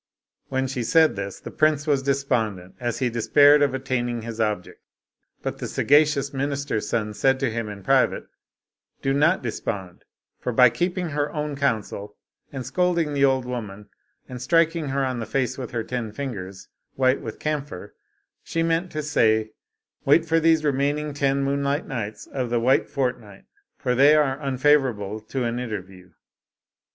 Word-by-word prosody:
When 130 0 0
she 130 -1 -3
said 160 +7 +4
this, 100 0 -5
the - - -9
prince 155 -1 +2
was 145 -3 +2
despondent, 115 -9 -1
as 120 -1 -2
he 130 - 0
despaired 145 +5 +5
of 140 -2 +2
attaining 120 -3 -2
his 115 -1 -4
object, 105 -4 -2 0.6
but - - -4
the - - -4
sagacious 145 -1 +3
minis 140 0 -2
ter's 110 - -2
son 105 -2 -1
said 135 +5 +2
to 135 -4 0
him 115 -1 -3
in 100 -2 -9
private, - - +2 0.4
" - - -52
Do 135 - +1
not 150 +5 +3
despond, 100 -6 -5 0.4
for 125 - -2
by 125 0 +6
keeping 175 +6 -1
her 145 0 -1
own 150 -1 -3
counsel 110 -6 -2 0.3
and 130 -3 -6
scolding 170 -4 0
the 140 -1 +1
old 130 -2 +1
woman, 105 -5 -6 0.4
and 125 -1 -8
striking 165 +2 +2
her 135 0 0
on 130 -2 -2
the 110 - -5
face 130 +1 -1
with 125 - -5
her 115 -2 -3
ten 120 -2 -4
fingers 100 -7 -6 0.3
white 130 0 +2
with 110 - -7
camphor, 145 -10 -4 0.5
she 165 - -1
meant 165 +2 0
to 155 0 -3
say, 110 -6 +2 0.3
* - - -51
Wait 160 +4 +5
for 165 0 +2
these 160 -1 +3
remaining 145 +1 0
ten 140 -1 +1
moonlight 140 +1 0
nights 110 -5 -5
of 130 -3 -4
the 120 0 +1
white 130 +3 +2
fortnight, 120 -7 -3 0.3
for 125 -3 -1
they 140 +4 +6
are 145 -2 +1
un 135 -2 -2
favorable 125 -8 +2
to 125 +4 -4
an 120 +1 -2
interview.'" 95 -6 -7
130 Hz, 175 wpm, -24 LUFS, 115-145 Hz, 0.6 s, by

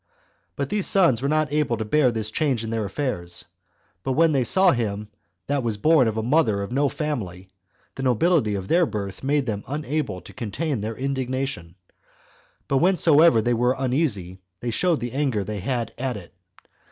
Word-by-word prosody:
2. - - -48 0.5
But 140 -1 -3
these 205 -2 0
sons 170 - +4
were 140 - 0
not 155 -1 +1
able 150 -6 +1
to 110 - -3
bear 130 +3 +3
this 110 -2 -3
change 135 -5 0
in 110 - -4
their 110 -2 -1
affairs; 95 -9 -3 0.6
but 130 - -1
when 165 +3 +4
they 135 -4 +2
saw 185 +8 +4
him 105 -3 -2 0.4
that 140 -1 0
was 115 -4 -1
born 150 +1 +4
of 110 0 -2
a 110 - -1
mother 115 -6 +2
of 100 - -7
no 140 +2 +2
family, 100 - -4 0.4
the - - -7
nobility 130 - +2
of 95 -1 -5
their 170 0 +3
birth 100 -3 -5
made 140 0 +1
them 105 -4 -3
unable 145 -7 -3
to 90 - -14
contain 130 - -3
their 110 +2 -4
indignation; 130 -9 -3 0.9
but 135 - +2
whensoever 165 - +5
they 120 - +1
were 125 +2 +2
uneasy, 125 - -1 0.2
they 120 - -3
showed 165 +7 +1
the 120 0 -3
anger 130 -6 0
they 105 +1 -5
had 120 +2 -2
at 130 -3 -2
it. 90 -4 -12
125 Hz, 190 wpm, -24 LUFS, 110-150 Hz, 0.9 s, whensoever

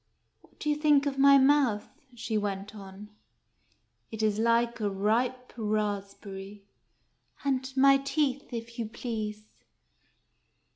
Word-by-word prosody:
" - - -48
What - - -26
do - - -5
you 300 - +2
think 295 -2 +3
of 275 -1 -2
my 280 0 +7
mouth? 265 -6 +3 0.2
" 255 -2 -24
she 225 -1 -4
went 205 -1 -3
on. 200 0 -11 0.5
" - - -43
It 220 -1 -4
is 215 -1 +1
like 235 +1 +2
a 210 -2 0
ripe 235 +6 -1
raspberry." 205 -2 -4 0.8
"And 265 -1 -1
my 275 +1 +6
teeth, 275 0 -1
if 235 0 -7
you 225 - -2
please 215 -2 -5
230 Hz, 140 wpm, -28 LUFS, 210-270 Hz, 0.8 s, my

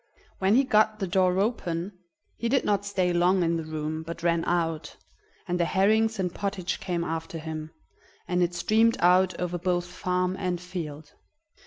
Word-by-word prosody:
When 195 +3 +3
he 270 - +5
got 215 -3 +3
the 200 - -2
door 185 0 +2
open, 185 -3 -2 0.4
he 235 - -2
did 270 +2 +2
not 205 -1 +1
stay 185 -3 +1
long 180 +1 +3
in 170 0 +1
the 165 - -3
room, 155 0 -4
but 170 +1 -7
ran 170 -1 +2
out, 165 -2 -1 0.5
and 180 0 -1
the 170 - +3
herrings 220 +4 +2
and 180 -2 -1
pottage 195 -3 -3
came 180 -4 -2
after 165 0 -4
him, 155 -1 -6 0.6
and 180 0 +1
it 175 0 +1
streamed 220 +6 +3
out 180 0 +4
over 180 0 -2
both 175 0 0
farm 180 +1 -1
and 180 -2 -1
field. 160 -4 -7
180 Hz, 175 wpm, -27 LUFS, 170-195 Hz, 0.6 s, he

